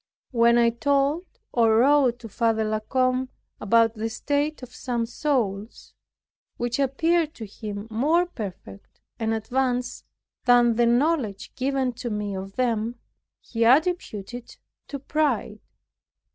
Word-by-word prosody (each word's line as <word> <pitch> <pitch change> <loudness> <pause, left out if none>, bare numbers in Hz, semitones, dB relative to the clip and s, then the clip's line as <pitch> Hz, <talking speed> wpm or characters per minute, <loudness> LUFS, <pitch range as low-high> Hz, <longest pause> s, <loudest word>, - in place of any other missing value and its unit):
When 235 -1 +4
I 235 -1 +4
told, 280 +7 +1 0.3
or 225 -2 +4
wrote 260 -1 +4
to 230 - -8
Father 225 +1 0
La 215 0 -1
Combe 255 +3 0 0.3
about 225 +2 +3
the 225 0 -3
state 290 +5 -2
of 250 0 -10
some 240 -2 -2
souls, 230 -5 -2 0.6
which 240 +1 -2
appeared 315 +4 +1
to 225 - -7
him 205 0 -7
more 305 +10 +2
perfect 190 - -9 0.2
and 225 -1 -1
advanced 250 +3 -1 0.4
than 240 -2 +5
the 240 +1 +3
knowledge 245 -4 0
given 265 -1 -1
to 240 +1 -5
me 210 -2 -3
of 195 +1 -7
them, 235 -2 0 0.5
he 230 -1 -2
attributed 255 - +2
it 245 -1 -9 0.3
to 280 - -5
pride. 270 -7 -1
240 Hz, 130 wpm, -25 LUFS, 220-275 Hz, 0.6 s, than